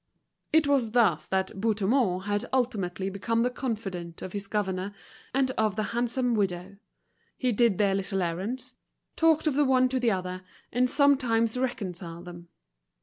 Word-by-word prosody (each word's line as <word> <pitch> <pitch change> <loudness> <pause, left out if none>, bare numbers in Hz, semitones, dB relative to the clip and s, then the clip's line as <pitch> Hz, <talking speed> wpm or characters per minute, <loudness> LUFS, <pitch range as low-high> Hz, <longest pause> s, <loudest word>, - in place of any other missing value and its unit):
It 315 -1 +4
was 265 -6 +2
thus 210 -10 +3
that 190 0 -1
Bouthemont 215 -2 +1
had 205 +4 -1
ultimately 200 -8 -1
become 230 +4 0
the 250 - +1
confidant 195 -10 -4
of 185 - -6
his 200 -1 -4
governor 195 -1 -2 0.4
and 265 0 +1
of 215 -5 0
the 215 - 0
handsome 240 +1 0
widow; 195 -2 -1 0.6
he 255 -2 +1
did 230 -3 +3
their 200 -2 +3
little 195 -1 -1
errands, 225 +10 -3 0.4
talked 325 -1 +3
of 305 - +2
the 295 +2 +3
one 255 -2 +4
to 260 0 0
the 245 -2 +2
other, 185 -2 -2 0.3
and 250 +2 +2
sometimes 250 -6 +3
reconciled 185 -9 -4
them. 175 -1 -10
215 Hz, 155 wpm, -28 LUFS, 190-255 Hz, 0.6 s, It